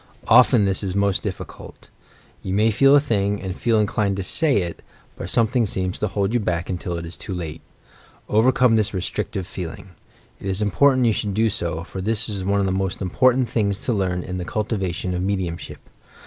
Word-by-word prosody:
Often 110 -5 +6
this 95 -1 +1
is 95 -2 -3
most 100 -1 +1
difficult. - - -8 0.5
You 95 - -3
may 110 +2 +3
feel 135 +6 +5
a - - +7
thing, 105 -7 0
and 95 -1 -5
feel 115 -1 +1
inclined 105 -2 0
to 95 - -2
say 140 - +2
it, 85 -1 -7 0.3
but - - -6
something 115 +1 +2
seems 95 -3 -2
to 105 - 0
hold 100 +2 -1
you 120 - +2
back 90 -4 -2
until 90 -1 -3
it 85 - -5
is 85 - -8
too 95 - -6
late. 80 -3 -6 0.7
Overcome 120 +1 +4
this 105 -1 +1
restrictive 95 +1 -3
feeling. 90 +1 -7 0.5
It - - -7
is 95 0 0
important 130 +5 +3
you 115 - +3
should 100 -1 -2
do 110 +1 +3
so, 85 -3 -3
for 95 +2 -7
this 110 +3 +2
is 100 -4 -1
one 100 +2 +1
of 100 - +1
the 95 - 0
most 95 -1 -2
important 125 +6 +2
things 100 -3 0
to 125 - +1
learn 90 -3 -1
in 90 0 -5
the - - -3
cultivation 95 -3 -2
of 90 - -2
mediumship. 95 -3 -4
100 Hz, 205 wpm, -22 LUFS, 90-110 Hz, 0.7 s, a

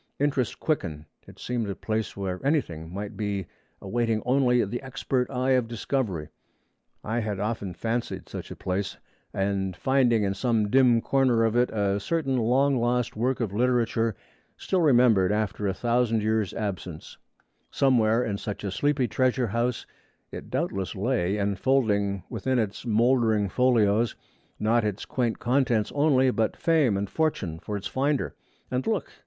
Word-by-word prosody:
Interest 140 -4 0
quickened. 85 - -2 0.2
It - - -14
seemed 120 -4 -3
a 100 - -3
place 110 -2 -3
where 95 0 -4
anything 85 - -1
might 100 +2 -6
be, 100 -3 -2 0.4
awaiting 115 +2 0
only 125 -2 +3
the 120 +5 -4
expert 130 -1 -2
eye 130 0 0
of 125 -3 +2
discovery. 110 - -2 0.7
I 115 +2 -1
had 105 -4 -3
often 105 -4 -3
fancied 115 +5 -3
such - - -7
a - - -7
place, 95 +2 -3 0.3
and 95 -1 -1
finding 125 -1 +2
in 100 -1 0
some 110 0 0
dim 125 -3 +5
corner 130 -4 +2
of 110 0 0
it 125 +1 +3
a 100 -2 0
certain 135 +3 -1
long 130 +4 +2
lost 120 0 0
work 125 +4 0
of 110 -5 -2
literature 115 -1 +1 0.4
still 185 -2 0
remembered 120 - +4
after 105 -1 -1
a 95 - 0
thousand 115 -2 +1
years' 110 -2 +1
absence; 95 -6 -5 0.5
somewhere 120 -3 +3
in 100 -4 -3
such 105 -1 -5
a 100 - -2
sleepy 140 +4 +1
treasure 130 +3 +1
house 115 +3 -1 0.5
it - - -8
doubtless 95 0 -2
lay, 100 -2 0
enfolding 100 -1 +1
within 130 -1 -1
its 110 +1 -2
mouldering 115 -2 +2
folios, 115 -1 +2 0.4
not 115 +2 +2
its 105 -1 -3
quaint 120 -3 -1
contents 120 -4 +1
only, 135 -3 +3
but 110 -3 -1
fame 150 -11 +2
and 100 +1 -2
fortune 100 - -1
for 105 +4 -4
its 100 - -8
finder. 140 +6 0 0.4
And 130 0 -1
look! 220 -4 -1
115 Hz, 155 wpm, -26 LUFS, 100-130 Hz, 0.7 s, dim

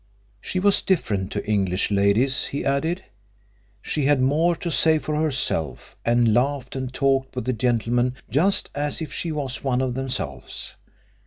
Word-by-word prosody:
She 185 - -2
was 200 +1 +3
different 100 - 0
to 105 - -3
English 100 -2 0
ladies, 105 +7 +2
he 140 - -4
added. 160 +7 0 0.8
She 150 -3 -1
had 145 -1 +4
more 155 +7 +3
to 170 +1 -4
say 160 0 +4
for 155 0 -3
herself, 145 - -1
and 120 -1 +3
laughed 130 +2 0
and 130 -1 -3
talked 135 -1 +1
with 125 - -3
the 130 - 0
gentlemen 120 +1 +1
just 165 - +1
as 145 0 -2
if 155 -4 -5
she 165 +3 -3
was 140 -4 -3
one 130 -2 +1
of 130 -1 0
themselves. 130 0 -4
135 Hz, 160 wpm, -23 LUFS, 120-150 Hz, 0.8 s, had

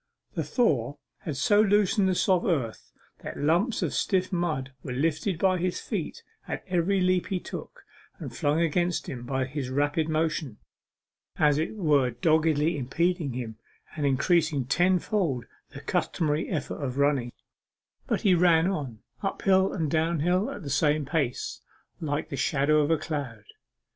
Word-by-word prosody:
The - - -2
thaw 145 - +1 0.2
had 150 -5 -5
so 205 +9 +4
loosened 205 -1 +3
the 185 - +1
soft 185 -1 +2
earth, 135 - -2 0.3
that - - -7
lumps 175 - +1
of - - -1
stiff 185 -1 0
mud 155 -7 -1
were 125 - -5
lifted 160 +6 0
by 185 +1 +2
his 180 +1 -1
feet - - -4 0.2
at - - -4
every 185 +2 +1
leap 185 0 +2
he 190 -2 -1
took, - - -9 0.3
and - - -8
flung 150 +3 +1
against 175 +1 0
him 125 -3 -5
by 130 0 0
his 130 -1 -4
rapid 145 +4 0
motion, 155 -6 -1 0.8
as 150 -1 +3
it 160 +7 -2
were 150 -10 +3
doggedly 155 +4 +2
impeding 165 +2 0
him, 115 -3 -6 0.4
and 150 -3 0
increasing 150 0 +2
tenfold 175 - +1 0.2
the - - -10
customary 155 -1 -1
effort 155 -2 -3
of 130 -1 -3
running, 140 -4 +1 0.8
But - - 0
he 195 - +4
ran 170 -2 +4
on 135 - -5 0.2
uphill, 195 -1 +2
and 160 -6 -2
downhill, 170 +4 +1
the 145 -7 -6
same 150 +1 +2
pace 140 -3 -2 0.4
alike 145 -3 -1
like - - -25
the 140 - -4
shadow 150 +3 +2
of 145 - 0
a 165 - +3
cloud. 140 -10 -5
155 Hz, 155 wpm, -27 LUFS, 140-180 Hz, 0.8 s, so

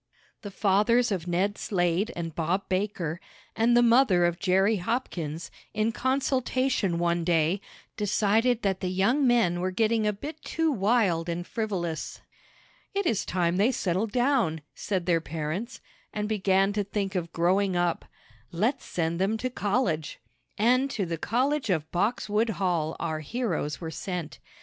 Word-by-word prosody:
The 205 - -6
fathers 210 +5 +2
of 180 -3 -2
Ned 190 +4 0
Slade 180 +3 0
and 165 -2 -4
Bob 175 +5 -1
Baker, 185 -4 -2 0.3
and 235 +2 +3
the 240 - +6
mother 230 -7 +5
of 175 0 0
Jerry 195 +2 +3
Hopkins, 175 - -3 0.2
in 215 +1 +1
consultation 255 -6 0
one 170 0 +1
day, 165 +2 +2 0.4
decided 220 +3 +2
that 190 -2 0
the 185 - -2
young 215 +10 +2
men 225 -8 +3
were 185 +1 0
getting 220 +3 +1
a - - +3
bit 295 +10 -8
too 325 -1 0
wild 195 - +1
and 170 +1 -3
frivolous. 180 -8 -3 0.8
"It 400 -1 0
is 220 - +1
time 175 -1 +1
they 215 +6 +4
settled 205 -2 -1
down," 245 - +1
said 190 -4 -2
their 170 -2 +2
parents, 165 - -4 0.3
"and 210 0 -2
began 195 -1 +2
to 205 0 0
think 200 -1 -3
of 170 -3 -3
growing 185 +3 +2
up. 175 -1 0 0.5
Let's 225 - 0
send 170 0 -2
them 205 +4 +1
to 255 +3 -3
college!" 200 - -1 0.4
And 255 +5 +3
to 210 -8 -2
the 165 -2 -4
college 260 - 0
of 160 -4 -1
Boxwood 215 +3 0
Hall 170 -5 0
our 160 -2 -2
heroes 155 - -2
were 165 -2 -5
sent. 175 -2 -5
195 Hz, 155 wpm, -27 LUFS, 175-230 Hz, 0.8 s, the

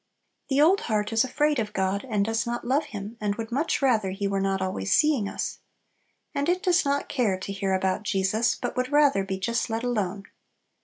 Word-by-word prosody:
The 270 0 +2
old 350 +7 +5
heart 210 0 0
is 225 - +4
afraid 295 +2 +1
of 210 -2 -3
God, 195 +4 -1
and 205 -3 +1
does 225 +1 -1
not 240 0 -3
love 275 +5 +1
Him, 210 +2 -7
and 205 -1 0
would 225 +1 -6
much 285 +3 0
rather 220 -7 +3
He 195 +2 -2
were 195 0 0
not 195 0 0
always 185 - -2
seeing 280 -10 +3
us. - - -4 0.7
And 285 +3 0
it 365 +2 +1
does 360 -2 +3
not 280 -1 0
care 225 -8 0
to 190 +1 -6
hear 195 -1 0
about 190 +1 0
Jesus, 205 +3 +1
but 245 - -4
would 255 +2 -1
rather 290 -8 +4
be 190 0 -3
just 235 +5 -1
let 225 +1 -2
alone. 205 -5 -1
225 Hz, 210 wpm, -26 LUFS, 195-270 Hz, 0.7 s, old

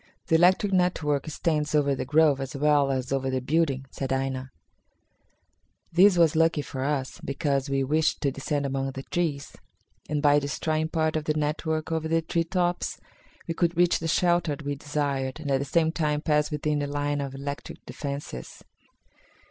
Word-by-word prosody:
"The 165 - +4
electric 185 +4 +4
network 160 -6 +1
extends 150 -1 -1
over 140 -2 +3
the 135 - -3
grove 150 -1 +3
as 135 0 -5
well 145 0 +3
as 130 -1 -2
over 135 -1 0
the 130 0 0
building," 135 0 0
said 135 -1 -4
Aina. 135 -1 -2 1.4
This 185 +2 +6
was 165 -2 +4
lucky 165 -2 +3
for 130 -1 -5
us, 140 -2 -2
because 140 -1 -1
we 135 0 +1
wished 155 +4 +1
to 140 - +1
descend 140 +1 -2
among 135 0 -1
the 135 - -6
trees, 150 -5 -2 0.5
and, 150 0 0
by 145 0 +5
destroying 155 +2 -1
part 160 -1 0
of 155 -1 -1
the 155 - 0
network 155 +1 -1
over 160 -1 -1
the 165 0 +1
tree 165 +1 0
tops, 175 0 -1 0.5
we 165 - -1
could 170 0 0
reach 175 0 +3
the 165 - -3
shelter 175 -2 +2
we 145 - -1
desired 140 -1 -2
and 145 -3 -4
at 135 - +3
the 140 - -2
same 160 +3 +2
time 150 -3 0
pass 150 -1 +1
within 150 0 -1
the 145 - -2
line 145 0 -1
of 135 -1 -5
electric 140 +1 -7
defences. 140 - -6
150 Hz, 180 wpm, -26 LUFS, 140-160 Hz, 1.4 s, This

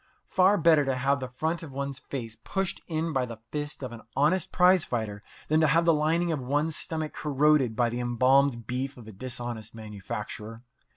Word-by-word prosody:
Far 190 +2 +4
better 160 -3 +5
to 135 -1 0
have 135 +2 +1
the 130 - -4
front 160 +7 -2
of 160 -4 -8
one's 140 0 -4
face 115 -5 -6
pushed 195 -1 -2
in 160 0 -2
by 130 -2 0
the 115 -2 -7
fist 145 -1 -4
of 130 - -4
an 115 -1 -9
honest 160 +7 +2
prize 180 -1 +5
fighter 110 -4 -3 0.3
than 155 +1 +3
to 155 - +5
have 165 +4 +3
the 165 - +5
lining 165 +3 +1
of 155 - -1
one's 145 +5 0
stomach 160 -3 -3
corroded 145 -4 +2
by 120 +1 +2
the 120 - -3
embalmed 125 0 +3
beef 130 +4 -3
of 115 -3 -12
a - - -8
dishonest 120 0 -6
manufacturer. 105 +1 -7
140 Hz, 195 wpm, -28 LUFS, 120-160 Hz, 0.3 s, better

